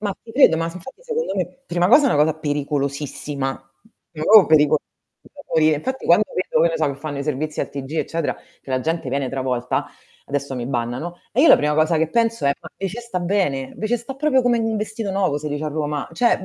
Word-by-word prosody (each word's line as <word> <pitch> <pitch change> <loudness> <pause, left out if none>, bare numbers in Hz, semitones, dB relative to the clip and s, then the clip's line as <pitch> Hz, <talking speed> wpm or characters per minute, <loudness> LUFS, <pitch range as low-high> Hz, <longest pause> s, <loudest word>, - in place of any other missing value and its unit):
Ma 205 -2 -2
ti 230 - -13
credo, 225 - +5
ma 165 - -1
infatti 185 - -9
secondo 475 - -2
me 185 +7 -4
prima 175 +1 +1
cosa, 280 +5 +6
è - - +2
una 145 - +4
cosa 155 0 +1
pericolosissima. 145 -1 -2 0.6
Ma 155 -2 -7
proprio 210 +3 +7
pericolosa 150 -1 +4 0.4
da 290 - -15
morire, 155 -1 +4
infatti 260 - -4
quando 175 +5 +5
vedo, 185 - +1
che 170 - +5
ne 165 - -2
so, 155 -1 +1
che - - -8
fanno 145 -1 -5
i 140 - -3
servizi 150 +1 -2
al - - -2
TG 135 -1 -7
eccetera, 165 -1 -1 0.3
che - - -12
la 130 - +1
gente 160 0 -2
viene 135 0 -1
travolta, 125 -1 -2 0.4
adesso 140 -1 -3
mi 120 -2 -4
bannano, 125 +7 -3 0.2
e 245 - +2
io 320 - +6
la - - +9
prima 150 0 0
cosa 155 +2 +2
che 160 0 +1
penso 230 -3 +1
è: 140 - +4
"Ma - - -10
eh 195 - -3
ce 220 +6 -6
sta 235 -6 -4
bene, 175 -8 -1
ve 215 - -3
ce 240 - +2
sta 240 +3 -8
proprio 270 -1 +2
come 245 -1 +2
in 225 - 0
un 225 -1 -1
vestito 215 0 -3
nuovo 190 -6 0
si 150 +1 -4
dice 145 +1 -3
a - - -1
Roma", 150 -1 -3
cioè 190 +1 +2
160 Hz, 240 wpm, -21 LUFS, 145-215 Hz, 0.6 s, la